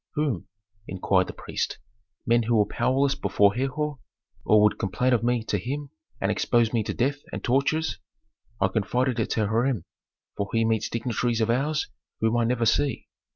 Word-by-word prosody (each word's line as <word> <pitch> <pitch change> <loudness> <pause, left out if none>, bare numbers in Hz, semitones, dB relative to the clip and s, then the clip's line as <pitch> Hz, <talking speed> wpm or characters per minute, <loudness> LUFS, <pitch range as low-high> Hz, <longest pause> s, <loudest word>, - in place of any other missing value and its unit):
"Whom?" 135 - -1 0.4
inquired 95 0 +1
the - - -6
priest. - - -4 0.5
"Men 120 0 +4
who 115 +1 +1
were 105 -2 +4
powerless 130 +6 +1
before 100 -6 +2
Herhor; 135 +3 -2 0.4
or 110 - +4
who 105 - +6
would 105 - +3
complain 125 +6 +1
of 115 - +2
me 120 -1 +1
to 105 -2 -1
him 140 +7 -5 0.3
and 95 - +1
expose 120 +1 +2
me 115 - +2
to - - -2
death 135 +5 0
and - - -5
tortures? 140 +5 +1 0.6
I 95 - +3
confided 120 +5 0
it 110 - 0
to 110 - +1
Hiram, 115 +2 +1 0.5
for 100 -1 -3
he 115 0 +2
meets 110 -1 0
dignitaries 115 0 -1
of 110 0 +2
ours 150 +5 0 0.3
whom 110 +1 +1
I 120 -1 +2
never 120 0 +1
see." 125 +3 +1
120 Hz, 180 wpm, -26 LUFS, 110-130 Hz, 0.6 s, who